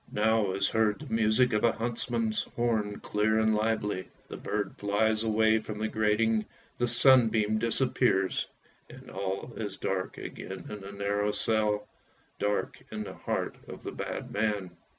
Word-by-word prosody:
Now 110 -2 +2
is 100 +1 +2
heard 110 -1 +2
the 150 -6 -8
music 115 +2 +3
of 105 - +1
a 115 - +4
huntsman's 115 -1 -1
horn 110 -4 0
clear 110 +1 +1
and 110 0 +3
lively, 105 -3 -1 0.2
the - - -6
bird - - -3
flies 110 +2 +2
away 110 0 +3
from 110 -1 -6
the 110 +1 -1
grating, 110 0 +2 0.4
the 120 - +2
sunbeam 115 -3 +5
disappears 115 -4 +1 0.4
and - - -12
all 95 +4 -4
is 105 -3 -4
dark 95 -1 -2
again 95 0 -7
in 105 - -5
the 100 +1 -8
narrow 100 +1 0
cell, 105 -1 +1 0.5
dark 105 0 -1
in - - -3
the - - -7
heart - - -3
of - - -9
the - - -4
bad - - -5
man. 100 -3 -1
110 Hz, 155 wpm, -29 LUFS, 105-115 Hz, 0.5 s, sunbeam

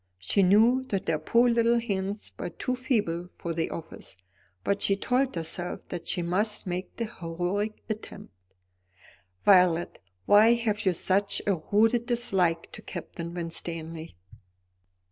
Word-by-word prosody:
She 90 - +1
knew 220 +7 +5
that 195 -7 -3
her 155 -2 +1
poor 235 +10 +3
little 235 0 +3
hands 200 -2 -3
were - - -3
too 255 +8 -3
feeble 205 -10 -1
for 170 - -4
the 165 0 -1
office; 160 - -8 0.5
but 200 0 0
she 195 - +3
told 250 +5 0
herself 170 +2 -3
that 175 -2 -6
she 175 - -1
must 205 +5 -1
make 180 0 -4
the 230 - -1
heroic 190 +2 -3
attempt. 215 - -7 1.1
"Violet, 180 -4 +4 0.3
why 220 +3 +6
have 215 -4 -1
you 185 - +4
such 195 +4 0
a 200 - +3 0.2
rooted 225 +3 +3
dislike 190 -9 +1
to - - -10
Captain 170 0 -7
Winstanley?" 165 - -5
195 Hz, 140 wpm, -27 LUFS, 170-225 Hz, 1.1 s, why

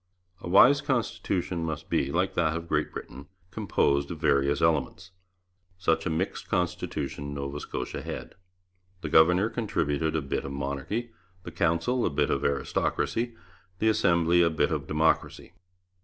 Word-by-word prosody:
A - - -7
wise 130 +10 +7
constitution 95 - -1
must 80 -3 -4
be, - - 0
like 95 +3 0
that 80 -2 +1
of 85 0 -7
Great - - 0
Britain, 70 - -9 0.2
composed 70 -4 +1
of 85 - -5
various 70 -2 +2
elements. 80 +3 0 0.7
Such 80 -1 +1
a - - 0
mixed 80 +4 -3
constitution 85 -5 -2
Nova 70 +1 -4
Scotia 65 - -5
had. - - -7 0.7
The 80 - -4
governor 90 +6 +5
contributed 80 - -1
a 80 - +1
bit 70 - -2
of 70 - -6
Monarchy, 70 - -3 0.3
the - - -8
Council 85 +8 +1
a - - +2
bit 70 - 0
of - - 0
Aristocracy, 115 - -1 0.4
the 110 +4 +2
Assembly 85 -4 +3
a 85 - +4
bit 80 +1 0
of 75 -3 -2
Democracy. 80 +2 0
85 Hz, 150 wpm, -27 LUFS, 70-90 Hz, 0.7 s, wise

